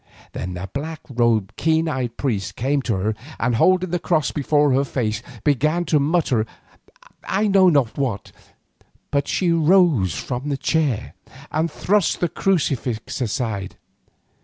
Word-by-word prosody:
Then 90 0 -5
the 90 +2 -5
black 155 +3 -5
robed, 115 -4 +1
keen 160 0 +2
eyed 130 -6 -3
priest 110 -9 -2
came 140 +3 0
to 115 -5 -1
her, 105 +3 -1 0.2
and 120 +1 +1
holding 185 +5 +3
the 175 - 0
cross 160 -3 +1
before 145 0 +2
her 135 +2 +3
face, 115 -5 -2 0.2
began 150 +5 +1
to 155 -2 +2
mutter 140 -7 +1 0.8
I 200 +3 0
know 195 -2 +5
not 140 -7 +1
what. 115 -8 -2 0.8
But 140 -1 0
she 180 -3 +1
rose 160 - +3
from 125 - -4
the 140 - -1
chair 140 -6 0 0.4
and 160 +2 0
thrust 200 +4 +1
the 175 - 0
crucifix 135 - -1
aside. 110 -5 -2
140 Hz, 145 wpm, -22 LUFS, 115-165 Hz, 0.8 s, know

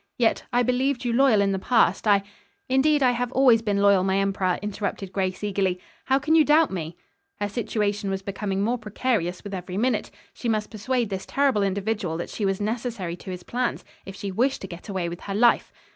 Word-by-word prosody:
Yet, 235 -2 +1
I 245 0 +3
believed 250 +1 0
you 240 - 0
loyal 245 -4 +4
in 200 0 +2
the 190 - -1
past. 220 -2 +2
I 200 -1 +4 0.2
" - - -41
"Indeed 285 +2 +3
I 250 - +5
have 245 0 -2
always 250 -4 +5
been 205 -3 0
loyal, 200 -2 +5
my 190 0 +1
emperor," 195 -2 0
interrupted 200 -2 -4
Grace 190 0 -2
eagerly. 190 -3 0 0.3
"How 265 - +3
can 295 +3 0
you 320 -1 +7
doubt 305 +1 +4
me?" 170 -2 -5 0.4
Her 205 - 0
situation 205 -2 -2
was 195 0 -3
becoming 195 0 -2
more 240 +3 0
precarious 210 -4 -2
with 200 -1 -7
every 180 0 -5
minute. 250 +4 0 0.2
She 240 - -4
must 215 -1 -1
persuade 235 +1 -1
this 190 0 -4
terrible 275 -6 +2
individual 200 -3 -1
that 170 - -5
she 210 - -2
was 195 -1 0
necessary 215 -4 -3
to 190 - -10
his 180 -1 -6
plans, 245 +4 -2 0.2
if 195 - -9
she 195 0 -5
wished 255 +8 0
to 190 - -6
get 180 +3 -10
away 190 -3 -2
with 170 0 -6
her 195 - -5
life. 235 +3 +3
205 Hz, 215 wpm, -25 LUFS, 190-245 Hz, 0.4 s, you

